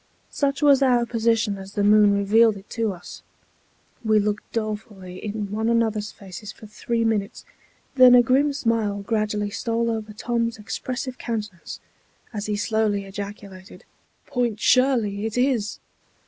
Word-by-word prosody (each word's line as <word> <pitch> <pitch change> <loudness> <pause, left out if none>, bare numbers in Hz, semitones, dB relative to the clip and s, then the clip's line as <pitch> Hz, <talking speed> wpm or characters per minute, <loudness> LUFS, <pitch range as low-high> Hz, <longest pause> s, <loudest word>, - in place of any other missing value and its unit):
Such 280 0 -1
was 280 -2 +6
our 245 -3 +3
position 225 -3 0
as 195 +1 -10
the 205 - 0
moon 210 0 +6
revealed 215 +2 +4
it 195 - -14
to 225 -3 -1
us. 175 -2 -10 0.8
We 220 -1 +3
looked 210 +1 -2
dolefully 210 -4 -5
in 210 -1 -4
one 220 +2 -1
another's 220 -2 0
faces 195 +2 -10
for 215 - -14
three 230 +2 -2
minutes; 210 -3 -2 0.5
then 255 -2 +8
a 245 - +7
grim 270 +5 +3
smile 225 -7 -1
gradually 210 -1 -1
stole 230 +2 -1
over 220 -1 -4
Tom's 230 +1 -2
expressive 255 +5 -5
countenance, 210 -6 -5 0.5
as 210 -1 -4
he 210 - -1
slowly 210 -1 0
ejaculated, 200 -1 -9 0.4
"Point 240 -4 -1
Shirley 230 -6 +2
it 225 - -5
is!" 245 -5 0
215 Hz, 145 wpm, -23 LUFS, 205-235 Hz, 0.8 s, then